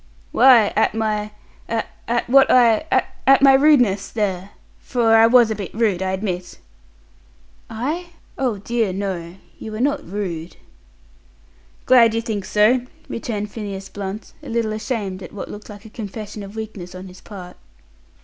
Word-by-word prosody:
"Why, 240 -6 +6
at 220 0 +2
my 215 -1 -1 0.4
at 230 +1 -2
what 270 +2 +5
I 240 +3 +4 0.4
at 270 0 +6
my 275 -1 +8
rudeness, 260 -9 +4
there! 195 -3 -2 0.3
For 230 -3 +2
I 225 0 +7
was 235 -1 +5
a - - -1
bit 200 -3 -6
rude, 215 -5 +1
I 190 0 -1
admit." 185 -2 -4 1.1
"I? 295 +11 -3 0.3
Oh 250 -6 -1
dear, 220 -1 -1
no. 185 -3 -4 0.2
You 220 - -7
were 215 - -5
not 285 +3 0
rude." 180 -4 -5 1.3
"Glad 230 -3 +5
you 230 - 0
think 210 -4 -3
so!" 220 +6 +3 0.3
returned 210 -3 -4
Phineas 200 -3 -6
Blunt, 200 +1 -7
a - - -10
little 230 -2 -1
ashamed 215 -3 -4
at 180 - -10
what 205 - -7
looked 210 +2 -10
like 205 0 -11
a - - -10
confession 210 -1 -7
of 200 +1 -10
weakness 205 -5 -7
on 185 +1 -8
his 185 0 -13
part. 180 -4 -10
215 Hz, 155 wpm, -21 LUFS, 195-235 Hz, 1.3 s, my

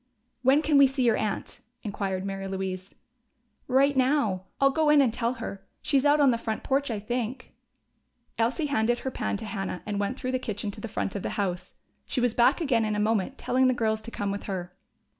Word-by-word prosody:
"When 270 +4 +4
can 300 -2 +4
we 280 - +8
see 265 -1 0
your 230 -2 +4
aunt?" 215 -2 -3 0.2
inquired 195 -2 -3
Mary 195 0 -4
Louise. 190 0 -4 0.7
"Right 275 +2 +3
now. 255 -8 +2
I'll 275 0 +5
go 310 +2 +2
in 300 -1 +6
and 255 -5 +3
tell 235 +1 0
her. 225 -5 -7 0.2
She's 275 -1 +2
out 295 +1 +5
on 280 -3 +6
the 235 - -1
front 220 -1 -3
porch, 275 +1 0
I 225 - -1
think." 240 +4 -4 0.9
Elsie 240 +8 +1
handed 240 -4 +1
her 265 - -1
pan 210 - -2
to 220 - -7
Hannah 195 -4 -4
and 205 -1 -2
went 205 +6 -1
through 255 -2 -3
the 255 - 0
kitchen 210 -3 -3
to - - -10
the 230 - -4
front 205 -2 -3
of 200 - -2
the - - -3
house. 185 -4 -3 0.3
She - - -1
was 245 -2 +2
back 240 +6 +4
again 260 -9 +2
in 215 -1 -1
a - - -1
moment, 220 +4 0
telling 260 +1 +2
the 255 - +2
girls 220 -2 0
to 230 - -8
come 205 -3 -3
with 200 - -5
her. 180 -3 -4
230 Hz, 220 wpm, -27 LUFS, 200-265 Hz, 0.9 s, we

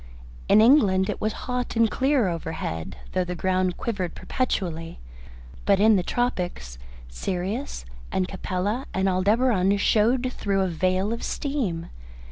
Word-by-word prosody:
In 215 - +7
England 210 -6 +5
it - - -7
was 215 - +1
hot 250 -1 -2
and 230 0 +4
clear 265 -4 +2
overhead, 160 - -4
though 185 - +1
the 180 0 -4
ground 185 0 0
quivered 190 -7 -3
perpetually, 170 -10 -3 0.7
but 200 -1 +3
in 215 +1 +6
the 185 - +2
tropics, 175 - -2 0.3
Sirius 180 - -4 0.3
and 185 -1 0
Capella 195 +6 -3
and 190 +1 +1
Aldebaran 200 +1 +2
showed 240 +5 +2
through 195 -1 0
a 190 - +1
veil 185 +4 0
of 235 - -5
steam. 230 - -2
195 Hz, 135 wpm, -25 LUFS, 180-230 Hz, 0.7 s, In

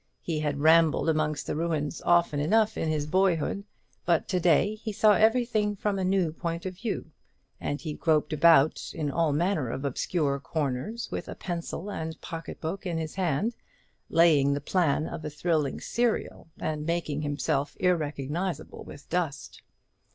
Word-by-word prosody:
He 160 -3 -2
had 145 -2 -2
rambled 160 0 +5
amongst 155 -1 0
the - - -3
ruins 160 -1 -2
often 170 -4 +3
enough 215 +8 +2
in 160 - -1
his 150 -2 0
boyhood; 185 +2 +1 0.4
but 170 -2 +1
to 185 - +1
day 175 +4 +3
he 215 +1 -5
saw 210 +1 +5
everything 220 0 +2
from 200 0 -1
a - - -1
new 185 -4 +1
point 170 +1 -4
of 185 - -3
view, 195 -3 -4 0.5
and 145 - -3
he 155 -3 -5
groped 155 0 +1
about 155 -1 +4
in 150 -4 -2
all 165 0 +1
manner 155 - 0
of 135 +4 -4
obscure 140 +1 0
corners, 155 - -3
with - - -4
a - - -6
pencil 175 +2 -5
and 160 -3 -5
pocket 165 0 -7
book 180 +5 -4
in 170 -2 -2
his 160 -1 -4
hand, 185 - 0 0.5
laying 150 -4 +4
the - - -1
plan 155 -1 +1
of 155 - -6
a - - -3
thrilling 150 -2 -1
serial, 235 -7 -1
and 155 0 -3
making 165 -3 -1
himself 145 -1 -1
irrecognizable 165 0 -1
with 145 - -12
dust. 160 -6 -3
165 Hz, 165 wpm, -28 LUFS, 150-185 Hz, 0.5 s, rambled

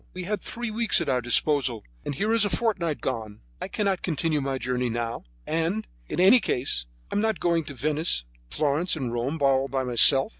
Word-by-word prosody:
We 185 - -4
had 205 +1 -3
three 240 -1 -5
weeks 230 +1 +3
at 165 -4 -2
our 125 -2 +1
disposal, 120 -1 +2 0.2
and 145 - -4
here 215 +8 0
is 230 -2 +3
a 205 - +1
fortnight 190 -8 -1
gone! 110 -5 -4 0.2
I - - -3
cannot 195 -3 -1
continue 155 -2 0
my 135 -1 -2
journey 125 0 -1
now; 115 0 -4 0.2
and, 165 +7 -1 0.2
in - - -3
any 195 +8 +7
case, 125 - -1 0.2
I - - -3
am 205 - +2
not 220 0 0
going 170 -2 +1
to 140 - -7
Venice, 150 - +1 0.3
Florence 155 - 0
and 130 -6 -4
Rome 125 +6 -2
all 135 0 +3
by 135 0 -2
myself. 130 - +5
150 Hz, 200 wpm, -25 LUFS, 125-185 Hz, 0.3 s, any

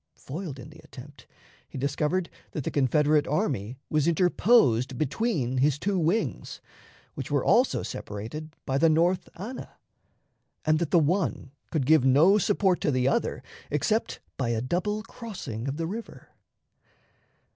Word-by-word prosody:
Foiled 150 0 -7
in 135 +4 -11
the 155 - -15
attempt, 140 +2 -13 0.4
he - - -8
discovered 150 +6 0 0.3
that 150 - -3
the - - -3
Confederate 150 +2 +2
army 125 -6 -1
was 150 0 +1
interposed 170 - +3
between 145 - -1
his 140 +1 +3
two 195 +4 -1
wings, 165 - -1 0.5
which - - -6
were - - 0
also - - +3
separated 115 +10 -6
by 135 0 0
the 165 +2 +5
North 175 +3 +2
Anna, 225 +8 -8 0.9
and 155 0 +3
that 170 -3 -1
the 175 - +4
one 165 -3 0 0.2
could 150 -5 -1
give 155 -1 +5
no 155 +10 +5
support 195 -2 +1
to 180 - +1
the 130 -2 +1
other - - 0 0.3
except 215 +10 0 0.2
by 125 -3 -1
a 115 -1 0
double 185 - -1
crossing 175 - -7
of 135 +2 -3
the 165 - -2
river. 220 +7 -7
155 Hz, 145 wpm, -27 LUFS, 135-180 Hz, 0.9 s, the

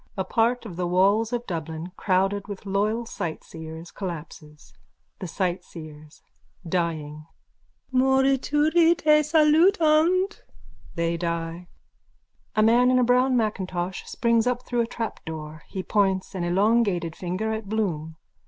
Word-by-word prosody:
A 190 - 0
part 230 +5 +1
of 180 -6 -8
the 180 -1 -1
walls 200 +5 +3
of 240 0 -2
Dublin, 165 -1 -5
crowded 195 +1 0
with 205 -1 -8
loyal 210 +4 0
sightseers, 160 -3 -7
collapses.)_ 155 -5 -8 0.5
THE 185 - -5
SIGHTSEERS: 160 -4 -5 0.4
(Dying.) 155 -3 -3 0.7
Morituri 275 +6 +3
te 305 -2 +4
salutant. 320 +4 +3 0.5
(They 170 0 0
die.) 170 0 -4 0.9
_(A 215 - +5
man 240 +3 +5
in 255 - +4
a 250 - +4
brown 250 +1 +3
macintosh 185 -5 -2
springs 235 0 +1
up 250 0 -1
through 240 -1 0
a 230 - -1
trapdoor. 160 -9 -6
He 190 - -5
points 195 -2 0
an 185 -2 -3
elongated 190 -3 +1
finger 190 +5 -3
at 220 -2 -5
Bloom.) 165 -8 -2
195 Hz, 125 wpm, -25 LUFS, 170-245 Hz, 0.9 s, A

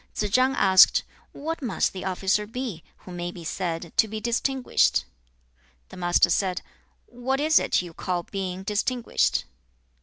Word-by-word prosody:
Tsze 210 -1 -2
chang 260 +1 +3
asked, 190 -4 +6 0.3
'What 320 +3 -5
must 235 -8 0
the 190 - -6
officer 190 +2 0
be, 225 -7 -5 0.2
who 185 - -9
may 175 0 -4
be 175 -1 -10
said 170 -1 -4
to 220 - +5
be 220 +1 -5
distinguished?' 245 +3 +1
2. - - -18 0.9
The - - -11
Master 175 -1 +3
said, 185 -2 0 0.4
'What 255 +3 -3
is 310 +1 +4
it - - 0
you 175 -2 -10
call 175 +1 -3
being 190 0 -5
distinguished?' 220 +5 0
195 Hz, 155 wpm, -25 LUFS, 180-250 Hz, 0.9 s, asked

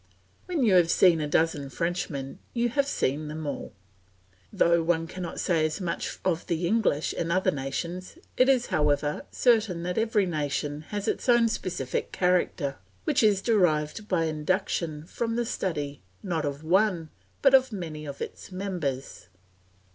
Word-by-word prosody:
When 340 -7 0
you 215 -5 +4
have 175 -2 +5
seen 170 -2 +5
a 150 - -1
dozen 150 -2 +1
Frenchmen 140 -2 -3 0.2
you 240 0 +2
have 280 +3 +1
seen 150 - -1
them 155 +1 -5
all. 145 - -4 0.8
Though 170 0 +3
one 165 0 +1
cannot 180 +1 -6
say 165 -4 +2
as 155 +5 -1
much 175 -3 -3
of 170 -3 0
the 170 0 -1
English 185 -6 +1
and 165 0 -2
other 185 +2 +2
nations, 170 - -4 0.2
it 255 +1 +4
is, 255 -3 +4
however, 150 0 +1
certain 220 -8 +2
that 180 +3 -1
every 220 -3 +2
nation 145 -2 -2
has 205 -1 -3
its - - -1
own 235 -1 +5
specific 175 - -3
character, 180 -6 +1 0.3
which 300 -4 +2
is 205 -3 +3
derived 180 -2 +1
by 180 -5 +1
induction 155 -1 -1
from 230 +5 -3
the 240 0 0
study, 150 - -3 0.2
not 165 -5 -1
of 145 +1 -4
one, 180 -1 +2 0.3
but 265 -2 +6
many 160 -6 -6
of 140 -1 -5
its - - -9
members. 175 - -4
170 Hz, 155 wpm, -27 LUFS, 150-205 Hz, 0.8 s, but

